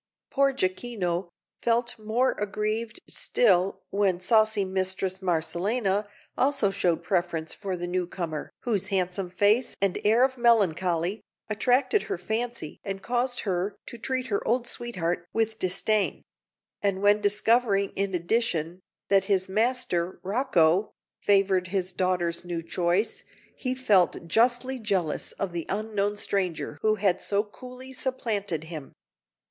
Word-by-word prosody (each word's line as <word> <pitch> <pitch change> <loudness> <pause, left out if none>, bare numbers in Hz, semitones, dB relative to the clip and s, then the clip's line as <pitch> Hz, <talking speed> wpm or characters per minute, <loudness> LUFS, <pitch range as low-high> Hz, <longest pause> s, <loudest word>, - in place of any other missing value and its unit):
Poor 275 0 +3
Jacquino 185 -5 -2 0.3
felt 235 0 +1
more 225 +5 +1
aggrieved 215 +2 -2
still 195 -5 +2
when 195 -3 +1
saucy 215 0 +3
Mistress 190 0 -1
Marcellina 190 +4 0 0.3
also 255 -7 +2
showed 175 -4 0
preference 175 -4 0
for 190 -3 -4
the 175 - -3
newcomer 175 -3 -3
whose 205 -5 -1
handsome 185 -1 -1
face 205 +7 +2
and 195 -2 +1
air 225 +5 +5
of 260 -1 -4
melancholy 185 -4 +2 0.3
attracted 255 - +2
her - - -3
fancy 220 -3 -4
and 195 -1 -5
caused 245 +1 0
her 190 0 -1
to 235 - -9
treat 255 +2 -2
her 205 -5 -1
old 240 +1 +2
sweetheart 180 -9 -3
with 225 0 0
disdain; 195 +3 +1 0.6
and 200 -1 0
when 205 +1 +5
discovering 210 0 +3
in 195 -1 -1
addition 175 -3 0 0.3
that 195 -1 +4
his 190 -1 +1
master, 205 -4 0
Rocco, 190 -3 +2 0.3
favoured 195 -2 +3
his 185 -1 -2
daughter's 180 -2 0
new 175 -2 -4
choice, 175 +5 0 0.3
he 255 -1 -2
felt 205 -10 +2
justly 245 +6 +2
jealous 190 -8 -1
of 195 -2 -3
the 170 -2 -4
unknown 205 0 -1
stranger 180 -8 -2
who 215 0 +3
had 195 -3 +1
so 205 0 +1
coolly 255 +4 -10
supplanted 215 - -2
him. 160 -3 -8
200 Hz, 130 wpm, -27 LUFS, 180-230 Hz, 0.6 s, air